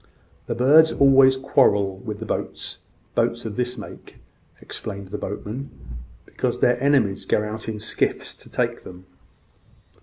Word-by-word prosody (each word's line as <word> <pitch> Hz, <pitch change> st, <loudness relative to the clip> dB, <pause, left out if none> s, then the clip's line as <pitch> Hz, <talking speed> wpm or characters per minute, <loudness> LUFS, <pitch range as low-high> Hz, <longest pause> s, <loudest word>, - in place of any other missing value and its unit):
"The 115 Hz, -, -2 dB
birds 150 Hz, +6 st, +6 dB
always 135 Hz, -1 st, +5 dB
quarrel 100 Hz, -7 st, +2 dB
with 105 Hz, +2 st, -6 dB
the 110 Hz, -, -7 dB
boats -, -, -4 dB, 0.3 s
boats 115 Hz, 0 st, 0 dB
of 110 Hz, -2 st, -5 dB
this 125 Hz, +1 st, -1 dB
make," -, -, -11 dB, 0.4 s
explained 100 Hz, -3 st, -6 dB
the 105 Hz, -, -5 dB
boatman; 110 Hz, +7 st, -5 dB, 0.6 s
"because -, -, -3 dB
their 125 Hz, 0 st, +2 dB
enemies 130 Hz, -9 st, +2 dB
go 105 Hz, -, +2 dB
out 110 Hz, +1 st, -5 dB
in 110 Hz, -1 st, -4 dB
skiffs 110 Hz, -, -2 dB
to -, -, -14 dB
take -, -, -1 dB
them. 90 Hz, 0 st, -12 dB
110 Hz, 145 wpm, -23 LUFS, 105-130 Hz, 0.6 s, birds